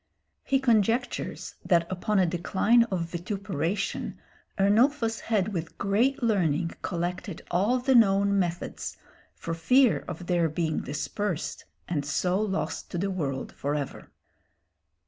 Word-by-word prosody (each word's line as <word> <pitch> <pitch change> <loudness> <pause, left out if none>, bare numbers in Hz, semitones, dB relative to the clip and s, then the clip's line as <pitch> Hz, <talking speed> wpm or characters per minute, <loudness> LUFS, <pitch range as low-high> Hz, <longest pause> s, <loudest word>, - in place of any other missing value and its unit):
He 270 0 +2
conjectures 235 -1 0
that 170 -3 +3
upon 200 +3 0
a 190 - +5
decline 190 +7 +3
of 190 -6 -2
vituperation 175 +1 -3 0.4
Ernulphus 225 +4 +3
had 215 -2 0
with 165 -2 -4
great 235 +7 +1
learning 175 -7 +1
collected 175 +1 -3
all 200 +8 +2
the 260 +2 +2
known 200 -3 +4
methods, 175 -1 -3 0.4
for 165 - -4
fear 245 +10 +3
of 175 0 -6
their 175 -2 +2
being 160 0 -1
dispersed 170 +5 -3 0.2
and 155 -5 -1
so 180 +7 0
lost 200 -2 -2
to 175 - -4
the 195 +3 -1
world 140 -8 -3
for 145 +1 -3
ever. 145 -2 -5
190 Hz, 125 wpm, -27 LUFS, 170-220 Hz, 0.4 s, a